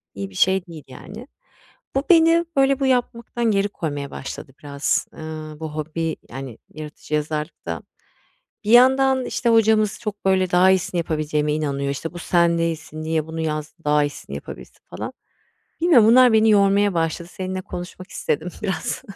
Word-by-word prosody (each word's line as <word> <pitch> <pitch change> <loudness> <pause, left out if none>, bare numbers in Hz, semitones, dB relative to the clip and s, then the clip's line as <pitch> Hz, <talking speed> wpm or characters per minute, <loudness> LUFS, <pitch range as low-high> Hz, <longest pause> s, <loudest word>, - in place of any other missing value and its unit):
İyi 100 -1 -5
bir 95 - -17
şey 190 - +2
değil 160 -3 -10
yani. 210 - -11 0.7
Bu 270 - +1
beni 335 0 +5
böyle 275 0 +3
bu 275 - 0
yapmaktan 240 -2 0
geri 200 0 +2
koymaya 145 -7 -5
başladı 135 - -7
biraz, 140 -1 -1
ııı, 155 -1 -8
bu 160 -2 -6
hobi 160 +1 -3
yani 130 -2 -8 0.2
yaratıcı 155 0 -9
yazarlıkta. 150 - -4 0.8
Bir 210 - -2
yandan, 260 +1 +5
işte, 240 - -1
hocamız 220 -2 +3
çok 210 -3 -6
böyle 185 -1 +2
daha 180 +1 +5
iyisini 185 -1 +1
yapabileceğime 150 -2 -1
inanıyor. 140 -2 -2
İşte, 150 +4 -5
"Bu 175 - -8
sen 170 -1 +2
değilsin, 160 -2 -3
niye 160 -1 -1
bunu 160 0 -5
yaz 155 -1 -3
daha 150 0 +3
iyisini 145 - -6
yapabilirsin." - - -10
falan. - - -6 0.7
Bilmiyorum. 285 -11 +6
Bunlar 250 +1 +7
beni 220 0 +5
yormaya 200 -1 +4
başladı. 165 +1 -2
Seninle 185 0 -4
konuşmak 180 +1 -8
istedim 160 +4 -2
biraz. 195 -3 -3
170 Hz, 155 wpm, -22 LUFS, 155-215 Hz, 0.8 s, Bunlar